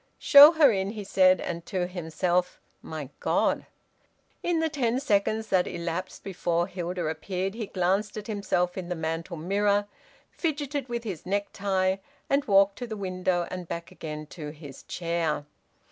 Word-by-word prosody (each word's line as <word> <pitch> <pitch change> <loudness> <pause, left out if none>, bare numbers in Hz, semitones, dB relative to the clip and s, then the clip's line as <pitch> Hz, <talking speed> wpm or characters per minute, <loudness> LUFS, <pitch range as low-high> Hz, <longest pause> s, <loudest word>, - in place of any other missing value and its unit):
"Show 290 +3 +9
her 305 -5 +6
in," 195 -2 -1
he 210 -2 -6
said, 185 -2 +4
and 170 0 -4
to 185 -2 -1
himself: 180 +1 -1 0.2
"My 155 -4 -6
God!" - - +1 0.7
In 345 -2 +1
the 320 - +2
ten 260 -5 0
seconds 220 -3 +1
that 180 -1 +3
elapsed 170 +2 -4
before 175 -3 0
Hilda 180 -1 -4
appeared 185 +5 -3
he 220 -2 -5
glanced 195 +3 0
at 210 - -5
himself 190 -4 -1
in 180 -1 -7
the 180 - -1
mantel 165 +2 -3
mirror, 200 +4 +1 0.5
fidgeted 290 -4 -2
with 235 -1 -3
his 185 -7 -6
necktie, 195 -1 0 0.3
and 280 +1 +3
walked 195 0 +4
to 245 - -4
the 220 -2 -5
window 185 -2 -1
and 180 -2 -5
back 170 0 -6
again 155 -1 -6
to 150 -4 -7
his 150 -3 -11
chair. 165 -4 -2
185 Hz, 160 wpm, -27 LUFS, 170-210 Hz, 0.7 s, Show